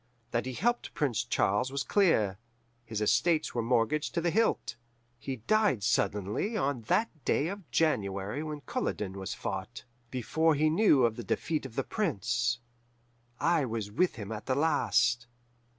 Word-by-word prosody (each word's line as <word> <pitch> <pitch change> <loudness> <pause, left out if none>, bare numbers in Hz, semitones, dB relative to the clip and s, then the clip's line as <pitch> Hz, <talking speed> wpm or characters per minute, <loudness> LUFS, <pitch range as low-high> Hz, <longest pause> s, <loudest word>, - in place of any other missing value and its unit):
That 120 +2 -1
he 130 - -3
helped 240 - -1
Prince 120 -7 0
Charles 120 +1 +1
was 140 0 -1
clear: 110 - +2 0.4
his 110 -2 -4
estates 155 +9 +2
were 120 - 0
mortgaged 120 +7 +1
to 170 - +1
the 170 0 +1
hilt. 225 +4 +1 0.4
"He 135 - -4
died 210 - +2
suddenly 105 - 0
on 140 - 0
that 210 -9 0
day 155 - +1
of 200 -4 -8
January 105 -5 0
when 155 -1 -5
Culloden 105 - -3
was 95 0 -5
fought, 95 +6 -5 0.2
before 155 +6 +1
he 155 +2 +3
knew 155 - +5
of 115 -2 0
the 120 - -5
defeat 150 - -1
of 115 - -16
the - - 0
Prince. 120 - 0 0.8
I 170 -3 +3
was 110 -4 -4
with 180 - +1
him 105 -3 -7
at 105 -1 -6
the 130 - +1
last. 140 -5 +2
130 Hz, 160 wpm, -30 LUFS, 110-160 Hz, 0.8 s, knew